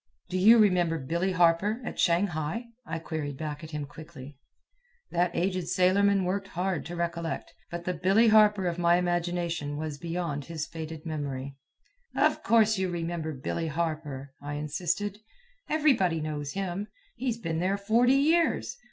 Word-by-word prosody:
"Do 185 - -1
you 220 +5 +8
remember 180 -6 +3
Billy 170 +7 -1
Harper, 180 +5 +3
at - - -6
Shanghai?" 175 +5 0 0.2
I - - -3
queried 155 -4 -4
back 150 0 -5
at 160 - -8
him 150 -2 -4
quickly. 145 -2 -11 0.8
That 175 +1 +2
aged 185 -1 0
sailorman 195 +2 +3
worked 195 +2 -1
hard 180 -2 -2
to 175 - -6
recollect, 170 -1 -3 0.2
but 170 0 -6
the 180 - 0
Billy 195 +6 +4
Harper 210 -3 +5
of 175 0 -1
my 170 0 +4
imagination 175 -4 -1
was 150 -2 -4
beyond 165 -4 -3
his 160 -1 -4
faded 160 -1 -7
memory. 140 -4 -4 0.6
"Of - - +2
course 220 -3 +4
you 190 -1 0
remember 170 -2 -3
Billy 155 +4 -3
Harper," 150 -4 -3
I 145 0 -5
insisted. 175 +7 -2 0.5
"Everybody 260 - +3
knows 150 -2 -4
him. 195 +1 -3 0.3
He's 245 -3 -2
been 165 -8 -3
there 190 +3 +1
forty 235 +6 +3
years. 325 - +2
170 Hz, 150 wpm, -28 LUFS, 155-195 Hz, 0.8 s, you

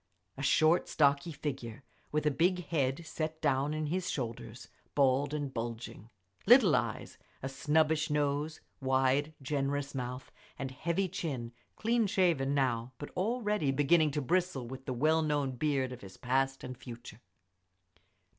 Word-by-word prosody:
A - - -7
short, 155 +4 +3
stocky 140 +2 +2
figure, 135 -5 -5 0.3
with 150 0 0
a 150 - +4
big 180 +4 +1
head 145 0 -1
set 155 0 -4
down 135 +1 +1
in 155 0 -2
his 185 +4 -1
shoulders, 120 -5 -5 0.3
bald 140 0 +3
and 145 -3 -3
bulging. 115 -2 -5 0.4
Little 230 - +7
eyes, - - -2 0.2
a - - -1
snubbish 155 +3 +2
nose, 150 +1 0 0.2
wide, 135 +3 +2
generous 140 0 -1
mouth, 125 0 -5 0.3
and 135 -1 -4
heavy 170 +8 -1
chin; 135 -9 -4 0.2
clean 230 0 +1
shaven 165 -8 +2
now, 125 -3 0
but 145 - -8
already 210 - 0
beginning 150 +3 +4
to 145 0 -2
bristle 175 -4 0
with 130 +2 -8
the 130 - -1
well 155 +6 +3
known 145 -3 0
beard 135 0 0
of 125 - -8
his 95 -1 -11
past 135 +2 0
and 130 - -6
future. 120 -2 -10
145 Hz, 145 wpm, -32 LUFS, 130-160 Hz, 0.4 s, Little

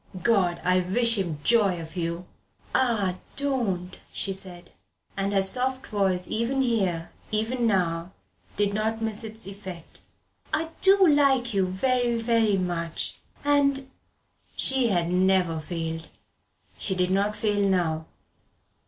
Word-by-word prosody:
God, 185 -6 +2
I 185 0 +3
wish 230 +5 +3
him 170 -5 -2
joy 205 -7 +3
of 165 +1 -9
you!" 170 0 -3 0.5
"Ah 210 -8 +1 0.2
don't," 230 -11 -1
she 195 - -1
said, 185 -2 -3 0.4
and 195 +1 -1
her 195 -1 +3
soft 255 +6 +1
voice 190 -4 0
even 250 +4 0
here, 190 -9 0 0.2
even 230 +3 0
now, 175 -4 0 0.5
did 205 -1 +1
not 220 +1 -1
miss 220 0 -3
its 220 -2 -9
effect. 190 -4 -9 0.5
"I 320 +1 -1
do 385 -1 +6
like 270 -5 +3
you 195 -2 +2
very, 240 +5 +1
very 225 -3 +2
much 170 -3 -3 0.3
and 280 -2 +2 0.3
" - - -37
She 265 -2 +3
had 175 -5 +1
never 180 -3 +2
failed. 165 0 -5 0.7
She 190 - +1
did 180 0 +1
not 200 +2 +1
fail 205 -2 +1
now. 160 -4 0
200 Hz, 135 wpm, -26 LUFS, 180-235 Hz, 0.7 s, do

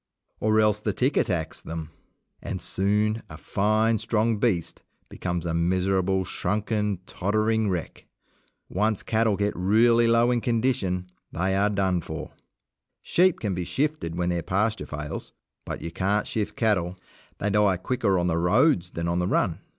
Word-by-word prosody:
Or 110 0 +3
else 105 -1 +3
the 105 -1 -2
tick 130 +7 +1
attacks 85 -4 -1
them, 80 -1 -6 0.5
and 95 - -4
soon 105 +5 0
a 75 - -9
fine, 110 +5 +1
strong 110 0 +1
beast 100 -8 0 0.3
becomes 85 -2 -3
a 85 - -1
miserable, 95 +2 +1
shrunken, 105 -2 -1
tottering 110 +3 0
wreck. 90 -3 -4 0.6
Once 105 +2 0
cattle 110 -2 +2
get 105 0 0
really 115 +5 +4
low 115 +1 +4
in 120 -1 +1
condition 110 -7 0 0.2
they 95 +3 0
are 100 +2 +3
done 95 -3 +1
for. - - -7 0.7
Sheep 180 0 +3
can 105 -3 -2
be 90 0 -2
shifted 140 - -2
when 90 0 0
their 85 -1 0
pasture 105 +6 -1
fails, 75 0 -6 0.3
but - - -5
you 85 - -5
can't 100 +5 0
shift 110 -2 -3
cattle. 95 -5 0 0.4
They 105 - -1
die 105 -2 +3
quicker 100 0 0
on 90 - +1
the 85 -2 +1
roads 90 - +3
than 85 -1 -4
on 85 +1 0
the 90 - 0
run. 90 -4 +1
100 Hz, 160 wpm, -26 LUFS, 90-110 Hz, 0.7 s, really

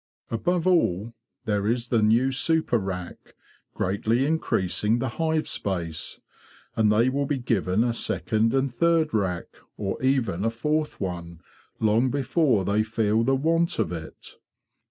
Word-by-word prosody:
Above 170 +9 0
all, 115 - +2 0.3
there 105 -2 0
is 120 +1 -1
the 115 -3 +2
new 115 +5 +3
super 135 -2 +1
rack, 90 -3 -6 0.4
greatly 110 +7 0
increasing 110 - 0
the 130 +1 -2
hive 160 -1 +1
space, 85 -4 -3 0.6
and 110 -1 +3
they 115 +4 +3
will 140 +2 0
be 145 - 0
given 110 -4 +1
a 120 -1 0
second 115 -1 0
and 135 -1 0
third 165 +3 +2
rack, 95 -5 -2 0.2
or 95 -2 -3
even 130 -9 +1
a 115 - +2
fourth 150 +7 -2
one, 85 -3 -5 0.4
long 110 +4 +3
before 135 - +1
they 100 +3 +2
feel 110 0 +1
the 135 +2 +2
want 165 +4 +1
of 80 - 0
it. 80 -2 -9
115 Hz, 145 wpm, -25 LUFS, 100-135 Hz, 0.6 s, new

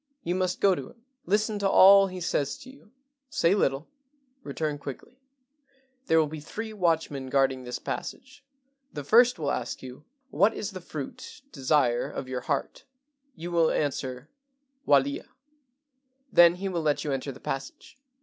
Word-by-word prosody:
You 175 - -1
must 185 -1 -1
go 195 -1 +5
to 140 -7 -5
him. 230 0 -21 0.2
Listen 210 +2 +1
to 200 -1 +1
all 195 +1 +8
he 185 -1 -7
says 145 -4 -1
to 260 - -12
you. 265 -5 -20 0.4
Say 170 -5 +2
little. 140 -7 0 0.5
Return 155 - -3
quickly. 145 - -9 0.9
There 160 - +4
will 160 - +4
be 155 +1 -7
three 220 +9 -7
watchmen 160 -8 0
guarding 135 -1 +1
this 125 0 -4
passage. 265 +2 -7 0.5
The 145 - -6
first 240 - +5
will 145 -3 -1
ask 120 +1 -4
you, 130 +3 -10
' 270 -1 -48
What 210 +3 +5
is 210 - -4
the 185 -1 -8
fruit 155 - -8
[desire] 130 -4 +1
of 130 - -6
your 130 -1 -4
heart? 140 +2 -3 0.3
' 280 -1 -46
You 175 +2 -7
will 165 -2 +3
answer, 130 -2 -2 0.6
'Walia.' 140 0 +2 1.0
Then 175 0 +7
he 195 +2 -4
will 175 -3 -2
let 145 -2 0
you 150 - -2
enter 135 +1 -3
the 135 - -12
passage. 135 0 -6
160 Hz, 170 wpm, -27 LUFS, 135-195 Hz, 1.0 s, all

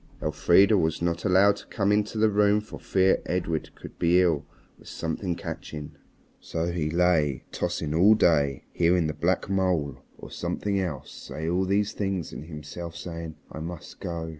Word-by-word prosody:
Elfrida 95 +4 +4
was 80 -2 0
not 85 +2 -1
allowed 100 +1 +5
to - - -12
come 100 -1 0
into 105 +1 +1
the 110 0 +3
room 105 0 +4
for 105 - -10
fear 95 0 +2
Edred 85 -3 -1
should - - -11
be 85 +2 +4
ill 80 -5 +2 0.3
with - - -17
something 85 +2 -3
catching. 75 -3 -7 0.5
So 85 +1 -3
he 80 -3 -1
lay 80 -5 +2
tossing 75 -1 -2
all 95 +7 +6
day, 70 -9 +2
hearing 85 0 +3
the 80 - -1
black 90 +4 0
mole, 90 -9 0 0.2
or - - -11
something 100 -1 -2
else, 80 -8 -4
say 80 +1 -6
all 90 +3 +1
these 100 +2 +1
things 95 -6 -3
and - - -7
himself 80 +2 -8
saying, 85 -2 -6 0.2
"I 75 - -7
must 85 +1 -8
go. 85 -1 -4
85 Hz, 170 wpm, -26 LUFS, 80-95 Hz, 0.5 s, all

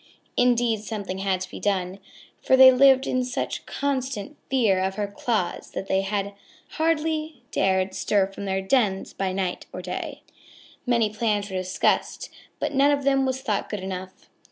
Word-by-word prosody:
Indeed, 240 -2 +3
something 205 -3 -5
had 190 -1 0
to 185 - -5
be - - -7
done, 190 -1 -1 0.4
for 260 - +4
they 260 0 +10
lived 265 0 +5
in 255 0 0
such 250 0 -4
constant 265 -3 -3
fear 225 -8 +3
of 190 +1 -1
her 210 - -1
claws 205 -1 -2
that - - -3
they 190 0 +1 0.7
hardly 315 -3 -1
dared 190 0 +1
stir 200 -2 +2
from 195 +1 -8
their 190 0 -1
dens 195 -3 +1
by 195 -1 -2
night 185 -1 -3
or 185 - -7
day. 180 - -5 0.6
Many 230 -3 +2
plans 210 -2 -1
were 190 - -2
discussed, 185 0 0 0.3
but - - -2
none 275 +1 +4
of 285 -1 +1
them 270 -1 +2
was 260 0 -2
thought 210 -5 -2
good 210 -3 -4
enough. 185 0 -7
210 Hz, 165 wpm, -25 LUFS, 190-260 Hz, 0.7 s, they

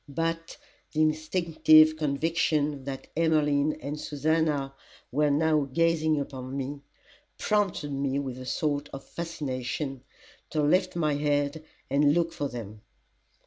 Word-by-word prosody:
But, 165 +3 -3 0.4
the 155 - +1
instinctive 155 0 +4
conviction 150 -1 0
that 135 -1 -6
Emmeline 155 -2 +2
and 150 +2 -6
Susannah 150 -2 0 0.4
were 150 +3 +2
now 155 0 +2
gazing 160 0 +2
upon 135 -1 -5
me, 140 +1 -4 0.6
prompted 200 -8 0
me 140 0 -1
with 130 -3 -4
a 130 - -8
sort 145 0 -1
of 135 0 -7
fascination, 135 -4 -4 0.5
to 155 -1 0
lift 180 +5 +2
my 155 -3 +1
head 145 +1 0 0.2
and 145 +2 +3
look 170 -1 +1
for 145 - -2
them. 110 -4 -8
150 Hz, 125 wpm, -28 LUFS, 140-160 Hz, 0.6 s, instinctive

